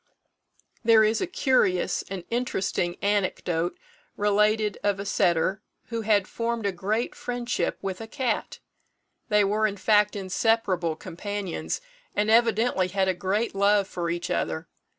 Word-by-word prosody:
There 225 -1 +6
is 215 +1 +2
a 375 - 0
curious 255 - +2
and 190 -2 -5
interesting 195 -7 -1
anecdote 185 -4 0 0.4
related 210 0 +2
of 200 -1 +1
a 200 - -4
setter 185 0 +1 0.3
who 230 -1 -2
had 205 -3 +2
formed 230 -1 -2
a 200 - +2
great 205 +6 -1
friendship 245 0 -2
with 190 0 -4
a 225 - -6
cat. 250 -1 -2 0.7
They 210 -1 +4
were, 210 +2 +2
in 205 -1 -5
fact, 210 +1 +3
inseparable 190 -3 0
companions, 200 +3 -4 0.3
and 210 +1 +2
evidently 230 -4 +3
had 190 +1 0
a - - +2
great 200 +5 -1
love 200 0 +3
for 175 -3 -3
each 170 +1 -3
other. 80 -1 -2
205 Hz, 140 wpm, -26 LUFS, 185-225 Hz, 0.7 s, There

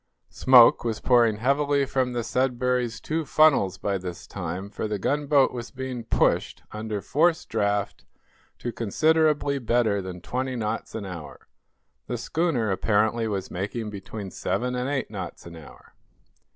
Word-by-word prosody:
Smoke 125 -3 +6
was 115 -2 -2
pouring 120 -4 +4
heavily 140 +3 +1
from 130 -2 -1
the 120 -1 -2
"Sudbury's" 125 -1 0
two 160 +1 -2
funnels 140 - +3
by 100 -2 -2
this 90 -1 -7
time, 95 +2 -5
for 110 - -3
the 105 -1 -2
gunboat 140 +4 +2
was 120 -1 -6
being 130 -3 -6
pushed, - - +1
under 105 -1 -4
forced 160 - +1
draught, 100 -2 -1 0.5
to 120 - -4
considerably 150 +5 +2
better 115 -4 +1
than 90 -1 -7
twenty 130 +7 -3
knots 110 -3 -3
an 110 -3 -4
hour. 85 -5 -9 0.6
The 120 - -3
schooner 125 - 0
apparently 110 +4 +1
was 100 -3 -3
making 105 +4 -4
between 100 0 -7
seven 120 +7 -2
and 125 +1 -2
eight 140 -6 -2
knots 95 -5 -7
an 85 -1 -10
hour. 80 -3 -14
115 Hz, 150 wpm, -25 LUFS, 100-130 Hz, 0.6 s, Smoke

